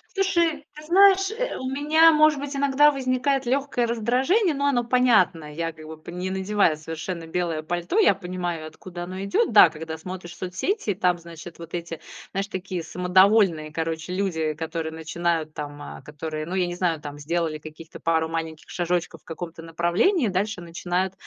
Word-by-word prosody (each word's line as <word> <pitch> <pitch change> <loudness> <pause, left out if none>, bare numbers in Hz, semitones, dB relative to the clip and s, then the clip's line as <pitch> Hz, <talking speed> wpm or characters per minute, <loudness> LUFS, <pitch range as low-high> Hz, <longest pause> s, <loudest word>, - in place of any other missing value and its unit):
Слушай, 340 -6 +1
ты 300 - -10
знаешь, 390 +3 +5
э, - - -3
у 260 - -4
меня, 310 +4 +5
может 305 -1 +5
быть, 285 +1 -5
иногда 280 +1 +5
возникает 265 0 0
лёгкое 255 -1 0
раздражение, 260 - +2
но 280 0 -1
оно 260 -4 +2
понятное. 220 -11 +2
Я 165 +1 -2
как 155 -1 -13
бы 160 - -7
по 155 - -12
не 180 +2 -4
надевая 190 -3 +1
совершенно 165 +2 -6
белое 165 -2 -2
пальто, 175 - -2
я 420 - +6
понимаю, 180 -4 -4
откуда 175 +2 -9
оно 185 +2 -6
идёт. 200 +3 +1
Да, 205 -5 +9
когда 160 0 -7
смотришь 175 +1 -8
соцсети, 200 - -2
там, 180 -2 +2
значит, 170 0 -11
вот 165 0 -10
эти, 170 -2 -5 0.3
знаешь, 195 +1 -2
такие 185 -3 -5
самодовольные, 180 -2 +3
короче, 160 +2 -3
люди, 165 -5 -1
которые 160 +1 -4
начинают 160 0 -2
там, 145 -1 -7
а, - - -9
которые, 155 +2 -6
ну, 175 +4 -4
я 180 -2 +1
не 175 - -4
знаю, 175 -3 0
там 145 -1 -8
сделали 160 +1 -2
каких-то 155 +1 -11
пару 160 -1 +1
маленьких 160 -1 -5
шажочков 175 -2 -2
в - - -39
каком-то 165 0 -7
направлении, 175 - +1
дальше 200 +1 -1
начинают, 175 +2 -2
180 Hz, 175 wpm, -24 LUFS, 165-245 Hz, 0.3 s, Да